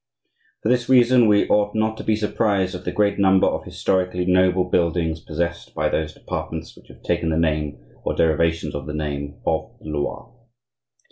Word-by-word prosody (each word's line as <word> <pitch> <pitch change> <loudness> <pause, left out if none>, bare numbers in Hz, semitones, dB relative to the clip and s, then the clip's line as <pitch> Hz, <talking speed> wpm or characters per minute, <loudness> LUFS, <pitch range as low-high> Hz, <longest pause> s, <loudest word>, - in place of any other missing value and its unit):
For 110 - +1
this 125 -1 +1
reason 125 -2 +5
we 105 -1 +4
ought 105 0 +2
not 110 0 +1
to - - -6
be 110 - +2
surprised 105 -3 0
at 90 - -7
the - - -1
great 105 -1 +1
number 95 -1 +4
of - - -1
historically 90 -1 -1
noble 90 0 +3
buildings 85 -2 0
possessed 85 +1 -4
by - - +1
those 80 -1 -1
departments 80 -2 -6
which - - -19
have - - -17
taken 85 -1 0
the 80 - 0
name, 75 -4 0 0.3
or - - -1
derivations 80 -1 +1
of 75 -1 -5
the 75 - -4
name, 70 -2 -4
of - - -2
the 80 - -10
Loire. 75 -1 -4
90 Hz, 185 wpm, -22 LUFS, 80-100 Hz, 0.3 s, reason